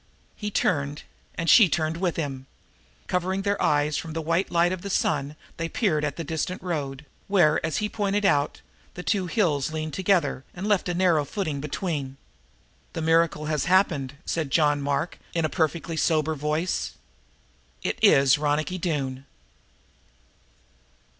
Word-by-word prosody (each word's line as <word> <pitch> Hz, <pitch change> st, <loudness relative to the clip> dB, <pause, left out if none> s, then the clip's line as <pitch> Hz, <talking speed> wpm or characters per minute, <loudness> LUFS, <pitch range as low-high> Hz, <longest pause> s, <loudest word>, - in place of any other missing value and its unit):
He 210 Hz, -, -4 dB
turned, 145 Hz, -7 st, 0 dB, 0.3 s
and 165 Hz, -, -3 dB
she 205 Hz, +1 st, +7 dB
turned 155 Hz, +2 st, 0 dB
with 175 Hz, -1 st, -1 dB
him. 135 Hz, -4 st, -4 dB, 0.6 s
Covering 185 Hz, +2 st, -1 dB
their 200 Hz, 0 st, 0 dB
eyes 145 Hz, 0 st, +2 dB
from 160 Hz, -, -5 dB
the 165 Hz, -, -2 dB
white 165 Hz, +4 st, 0 dB
light 175 Hz, 0 st, +3 dB
of 185 Hz, -1 st, -3 dB
the 200 Hz, -, -6 dB
sun 145 Hz, -5 st, 0 dB, 0.2 s
they 165 Hz, 0 st, -3 dB
peered 160 Hz, -10 st, +1 dB
at 145 Hz, -2 st, -1 dB
the 165 Hz, -, -4 dB
distant 160 Hz, +4 st, -3 dB
road, 150 Hz, -5 st, -3 dB, 0.2 s
where, 175 Hz, -6 st, +3 dB
as 160 Hz, 0 st, -1 dB
he 210 Hz, -, 0 dB
had 210 Hz, -, -6 dB
pointed 205 Hz, -1 st, 0 dB
out, 145 Hz, -7 st, +2 dB, 0.3 s
the 180 Hz, -, -6 dB
two 190 Hz, -2 st, 0 dB
hills 155 Hz, -, +1 dB
leaned 155 Hz, -1 st, -4 dB
together 180 Hz, -9 st, +1 dB
and 185 Hz, +3 st, -5 dB
left 205 Hz, -4 st, +1 dB
a 175 Hz, -, -1 dB
narrow 175 Hz, -4 st, +3 dB
footing 155 Hz, -3 st, -3 dB
between. 145 Hz, -3 st, -3 dB, 0.8 s
"The 165 Hz, -, -3 dB
miracle 165 Hz, -1 st, +2 dB
has 150 Hz, -2 st, -1 dB
happened," 165 Hz, -8 st, +2 dB
said 160 Hz, -4 st, -2 dB
John 145 Hz, 0 st, +3 dB
Mark 140 Hz, +4 st, -2 dB, 0.2 s
in 165 Hz, -2 st, +1 dB
a -, -, 0 dB
perfectly 160 Hz, -1 st, -1 dB
sober 160 Hz, -1 st, +2 dB
voice. 155 Hz, +4 st, -1 dB, 0.9 s
"It -, -, -2 dB
is 135 Hz, 0 st, +6 dB
Ronicky 155 Hz, +5 st, 0 dB
Doone!" 140 Hz, -6 st, -2 dB
160 Hz, 160 wpm, -25 LUFS, 145-180 Hz, 0.9 s, she